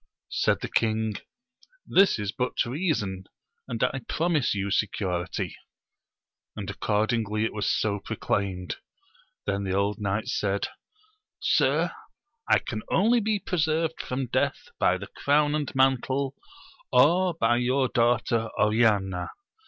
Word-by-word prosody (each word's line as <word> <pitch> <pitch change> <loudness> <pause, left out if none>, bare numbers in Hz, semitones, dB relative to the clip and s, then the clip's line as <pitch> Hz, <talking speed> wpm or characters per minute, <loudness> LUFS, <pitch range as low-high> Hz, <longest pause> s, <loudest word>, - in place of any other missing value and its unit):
Said - - +1
the - - -3
king, 110 -1 0 0.7
this 195 +1 +4
is 105 -2 -2
but 125 +2 -1
reason, 120 - -2 0.4
and - - -2
I - - 0
promise 160 -8 +1
you 100 0 -2
security; 95 -4 -1 1.0
and - - -5
accordingly 110 0 0
it - - -3
was 105 -2 -1
so 105 -1 0
proclaimed. 95 -2 -2 0.7
Then 100 0 -1
the 95 -1 -1
old 100 +2 0
knight 105 +1 -1
said, 100 -1 -1 0.7
Sir, - - +2 0.6
I - - +6
can 110 -3 -4
only 230 +5 +4
be 215 -1 +1
preserved 165 -4 0
from 130 +1 -3
death 120 - -1
by - - +3
the - - -7
crown 145 +1 +1
and 150 -2 -1
mantle, 135 +1 +2 0.6
or 170 +7 +4
by 120 -5 +2
your 130 +2 +2
daughter 120 -1 +1
Oriana 105 -5 +2
115 Hz, 125 wpm, -26 LUFS, 100-145 Hz, 1.0 s, I